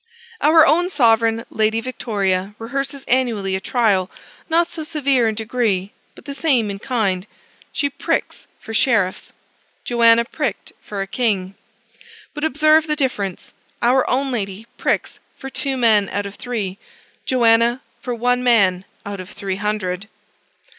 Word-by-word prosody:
Our 315 Hz, +1 st, +6 dB
own 350 Hz, +3 st, +3 dB
sovereign 230 Hz, -6 st, +3 dB
lady 220 Hz, +1 st, +1 dB
Victoria 205 Hz, -5 st, -2 dB
rehearses 275 Hz, +4 st, -4 dB
annually 230 Hz, -7 st, 0 dB
a -, -, -1 dB
trial 200 Hz, -4 st, +1 dB, 0.4 s
not 335 Hz, +1 st, +3 dB
so 320 Hz, -2 st, -6 dB
severe 280 Hz, -6 st, +1 dB
in 220 Hz, -, -1 dB
degree, 215 Hz, -4 st, -1 dB, 0.2 s
but -, -, -16 dB
the 280 Hz, -, -5 dB
same 265 Hz, -7 st, +1 dB
in 195 Hz, -, -6 dB
kind. 200 Hz, -6 st, -1 dB, 0.4 s
She 285 Hz, -, 0 dB
"pricks" 280 Hz, -, -3 dB
for 225 Hz, -, -9 dB
sheriffs. 215 Hz, -6 st, +1 dB, 0.5 s
Joanna 235 Hz, -1 st, +4 dB
pricked 250 Hz, -6 st, -4 dB
for 200 Hz, -2 st, -4 dB
a -, -, -6 dB
king. 195 Hz, -3 st, -1 dB, 0.8 s
But 295 Hz, -, -6 dB
observe 310 Hz, +1 st, +4 dB
the 300 Hz, -, +1 dB
difference: 210 Hz, -, -3 dB, 0.3 s
our 250 Hz, +2 st, +3 dB
own 270 Hz, +2 st, 0 dB
lady 205 Hz, -2 st, -4 dB
pricks -, -, -1 dB, 0.2 s
for 270 Hz, -, -8 dB
two 270 Hz, -1 st, -2 dB
men 220 Hz, -5 st, +4 dB
out 205 Hz, 0 st, -2 dB
of 200 Hz, -, -7 dB
three; 205 Hz, -6 st, -4 dB, 0.5 s
Joanna 235 Hz, 0 st, +3 dB, 0.2 s
for 250 Hz, -2 st, -3 dB
one 245 Hz, +1 st, +1 dB
man 195 Hz, -7 st, +3 dB, 0.2 s
out 200 Hz, -1 st, -5 dB
of 185 Hz, +1 st, -8 dB
three 195 Hz, -2 st, -4 dB
hundred. 205 Hz, -1 st, -3 dB
230 Hz, 145 wpm, -20 LUFS, 200-265 Hz, 0.8 s, Our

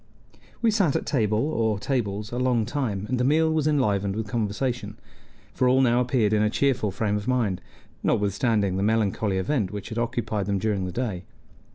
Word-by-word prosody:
We 230 Hz, -, +4 dB
sat 195 Hz, -9 st, +2 dB
at -, -, -1 dB
table 110 Hz, -6 st, +1 dB
or 115 Hz, -5 st, 0 dB
tables 105 Hz, -2 st, -2 dB
a 120 Hz, -, -3 dB
long 125 Hz, -3 st, +2 dB
time, 105 Hz, -8 st, -2 dB
and 125 Hz, +1 st, -1 dB
the -, -, +2 dB
meal 160 Hz, +4 st, +3 dB
was 155 Hz, -1 st, +1 dB
enlivened 105 Hz, -9 st, +1 dB
with 110 Hz, 0 st, -2 dB
conversation; 110 Hz, 0 st, -2 dB, 0.6 s
for 125 Hz, -, +2 dB
all 130 Hz, +1 st, +4 dB
now 125 Hz, -2 st, +4 dB
appeared 120 Hz, -4 st, +1 dB
in 105 Hz, -, +3 dB
a 105 Hz, -, +3 dB
cheerful 125 Hz, -3 st, +1 dB
frame 105 Hz, +1 st, -1 dB
of 105 Hz, +2 st, -6 dB
mind, 115 Hz, -8 st, 0 dB, 0.4 s
notwithstanding 100 Hz, -1 st, +1 dB
the -, -, -1 dB
melancholy 105 Hz, -2 st, +1 dB
event 100 Hz, +1 st, 0 dB
which 105 Hz, +2 st, -6 dB
had 115 Hz, 0 st, -3 dB
occupied 115 Hz, -4 st, -2 dB
them 100 Hz, -1 st, +1 dB
during 100 Hz, -2 st, -1 dB
the 90 Hz, -, -4 dB
day. 100 Hz, -4 st, -3 dB
110 Hz, 190 wpm, -25 LUFS, 100-125 Hz, 0.6 s, We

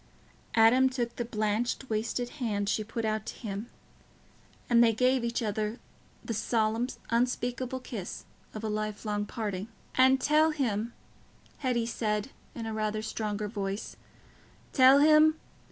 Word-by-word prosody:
Adam 240 Hz, +4 st, +6 dB
took 240 Hz, -2 st, -3 dB
the 240 Hz, -, -2 dB
blanched 220 Hz, +4 st, -1 dB
wasted 230 Hz, +2 st, -2 dB
hand 205 Hz, -4 st, -1 dB
she 215 Hz, +1 st, 0 dB
put 225 Hz, +1 st, -4 dB
out 215 Hz, -1 st, -1 dB
to -, -, -7 dB
him, 210 Hz, -1 st, -5 dB, 1.0 s
and 235 Hz, -1 st, +6 dB
they 230 Hz, -, +5 dB
gave 255 Hz, +2 st, +2 dB
each 235 Hz, 0 st, -1 dB
other 215 Hz, +1 st, -2 dB, 0.5 s
the 230 Hz, -, -2 dB
solemn 225 Hz, +1 st, +1 dB, 0.2 s
unspeakable 245 Hz, +1 st, 0 dB
kiss 220 Hz, -7 st, -7 dB, 0.3 s
of 215 Hz, -, -6 dB
a -, -, -1 dB
lifelong 210 Hz, -1 st, -2 dB
parting. 205 Hz, -4 st, -4 dB, 0.3 s
"And 260 Hz, +1 st, +5 dB
tell 305 Hz, +3 st, +4 dB
him," 235 Hz, -7 st, -1 dB, 0.7 s
Hetty 250 Hz, -4 st, 0 dB
said, 215 Hz, +1 st, -2 dB, 0.2 s
in 230 Hz, -, -5 dB
rather 215 Hz, 0 st, -1 dB
a -, -, -10 dB
stronger 215 Hz, -1 st, -3 dB
voice, 200 Hz, -1 st, -4 dB, 0.8 s
"tell 265 Hz, 0 st, +7 dB
him... 310 Hz, +1 st, +6 dB
230 Hz, 135 wpm, -29 LUFS, 215-250 Hz, 1.0 s, tell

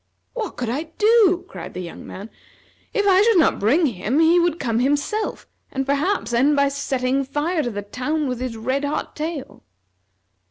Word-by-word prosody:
"What 460 Hz, -4 st, -5 dB
could 245 Hz, -, -3 dB
I 280 Hz, +7 st, -2 dB
do?" 420 Hz, -5 st, +4 dB
cried 175 Hz, -2 st, -9 dB
the -, -, -4 dB
young 175 Hz, -2 st, -8 dB
man. 200 Hz, +4 st, -9 dB, 0.6 s
"If 415 Hz, -3 st, 0 dB
I 380 Hz, 0 st, +6 dB
should 445 Hz, -1 st, +4 dB
not 320 Hz, -, +3 dB
bring 275 Hz, -, +3 dB
him 235 Hz, +1 st, -1 dB
he 330 Hz, +2 st, +5 dB
would 345 Hz, -1 st, +1 dB
come 230 Hz, -3 st, 0 dB
himself 290 Hz, -, -1 dB, 0.3 s
and, 270 Hz, 0 st, -2 dB
perhaps, 280 Hz, -, 0 dB
end 275 Hz, +5 st, +3 dB
by 280 Hz, 0 st, +3 dB
setting 275 Hz, -1 st, -1 dB
fire 295 Hz, +5 st, -1 dB
to 245 Hz, -, -2 dB
the 205 Hz, -2 st, -5 dB
town 280 Hz, +8 st, -2 dB
with 250 Hz, -2 st, -3 dB
his 250 Hz, -3 st, -4 dB
red 260 Hz, +5 st, -1 dB
hot 285 Hz, +1 st, -3 dB
tail." 305 Hz, -3 st, -5 dB
280 Hz, 185 wpm, -22 LUFS, 250-340 Hz, 0.6 s, I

